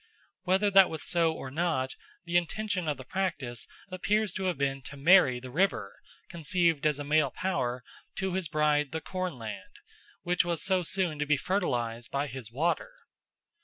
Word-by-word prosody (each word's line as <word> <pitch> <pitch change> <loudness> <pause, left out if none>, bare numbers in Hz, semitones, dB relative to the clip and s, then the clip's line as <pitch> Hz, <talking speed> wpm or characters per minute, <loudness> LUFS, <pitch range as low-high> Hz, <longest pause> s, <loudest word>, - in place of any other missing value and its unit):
Whether 190 +3 +3
that 195 -1 +7
was 160 -2 -5
so 170 -2 +3
or 135 -4 -7
not, 155 -4 -1 0.3
the 170 0 -4
intention 180 +1 0
of 150 -3 -1
the 130 - -9
practice 140 - -2 0.2
appears 210 +3 0
to 190 - -3
have 180 -5 0
been 135 0 -1
to 140 +2 -10
marry 140 -4 +5
the 130 0 -9
river, 165 - 0 0.3
conceived 165 -2 +1
as 150 -2 +1
a 145 - -4
male 150 0 +3
power, 125 -9 -2 0.3
to 190 -1 -2
his 185 -2 -1
bride 150 -1 +1
the 160 - -1
cornland, 155 - -5 0.5
which 180 +1 +2
was 170 -2 0
so 190 -1 +3
soon 175 -3 -1
to 150 - -1
be 150 0 +3
fertilised 120 - -1
by 140 +1 -1
his 130 -5 -6
water. 170 - -1
160 Hz, 170 wpm, -29 LUFS, 135-185 Hz, 0.5 s, that